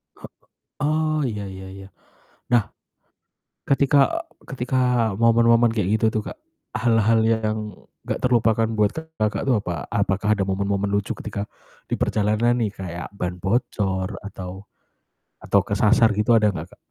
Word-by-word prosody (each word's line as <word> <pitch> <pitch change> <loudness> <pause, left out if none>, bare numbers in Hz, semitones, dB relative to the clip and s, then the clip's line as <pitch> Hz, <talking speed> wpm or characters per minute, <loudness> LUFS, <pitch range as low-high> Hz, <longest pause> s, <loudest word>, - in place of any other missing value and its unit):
Hek - - -12 0.5
oh, 155 +1 +1
ya 105 -6 -3
ya 95 0 -9
ya. 95 0 -11 0.6
Nah, 115 -4 +2 1.0
ketika 140 - +3 0.2
ketika 125 -3 +1
momen-momen 115 0 +4
kayak 105 0 +1
gitu - - +1
tuh, 110 - -1
Kak, - - -11 0.4
hal-hal 115 -1 +3
yang 110 -1 +1 0.5
gak - - -2
terlupakan 115 -3 +3
buat 105 -2 +2 0.3
Kakak 105 -1 0
tuh 135 -3 +3
apa? 85 -6 -4
Apakah 100 +2 0
ada 100 - +1
momen-momen 100 +1 -1
lucu 100 0 -1
ketika 105 -2 -5 0.5
diperjalanan 110 +3 +1
nih 105 -3 0
kayak 90 -2 -6
ban 90 -2 -4
bocor 95 -2 -1
atau 95 -1 -8 0.8
atau 100 - +2
kesasar 105 +3 +3
gitu 105 +3 +3
ada 105 -2 +4
gak, - - -8
Kak? - - -31
110 Hz, 135 wpm, -23 LUFS, 100-115 Hz, 1.0 s, momen-momen